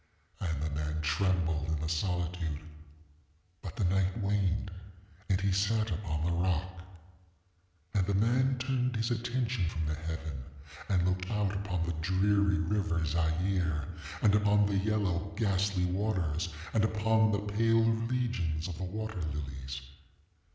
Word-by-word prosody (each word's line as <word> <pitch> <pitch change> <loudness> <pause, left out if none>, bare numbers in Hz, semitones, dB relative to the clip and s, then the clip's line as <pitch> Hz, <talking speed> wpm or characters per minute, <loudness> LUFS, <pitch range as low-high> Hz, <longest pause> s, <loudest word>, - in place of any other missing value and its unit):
And 80 -5 -2
the 80 - 0
man 75 +1 -2
trembled 80 -1 +1
in 80 -1 -1
the 80 - -2
solitude; 85 -2 -1 1.0
ŌĆöbut 90 - -6
the - - -1
night 95 +2 +2
waned, 100 -2 0 0.6
and 95 -1 +3
he 100 0 +1
sat 105 +3 +1
upon 80 -4 -2
the 85 - +1
rock. 90 +1 0 1.1
ŌĆ£And 95 -3 +2
the 100 - +1
man 125 +5 +3
turned 125 -1 0
his 115 +2 0
attention 120 -4 0
from 80 -1 -3
the 75 - 0
heaven, 80 -3 -5 0.5
and 90 -3 +3
looked 90 0 -1
out 105 -3 0
upon 95 -4 -2
the 85 - -1
dreary 100 +3 +3
river 95 -6 0
Zaire, 80 0 0 0.4
and 105 -2 +6
upon 105 0 +4
the 100 -1 +1
yellow 100 -2 0
ghastly 100 -3 +1
waters, 90 -4 0 0.2
and 110 - +3
upon 110 0 +3
the 105 0 -2
pale 115 +1 +4
legions 115 -8 0
of 90 -2 -6
the - - -3
water 110 0 -4
lilies. 70 -3 -4
95 Hz, 145 wpm, -31 LUFS, 80-105 Hz, 1.1 s, and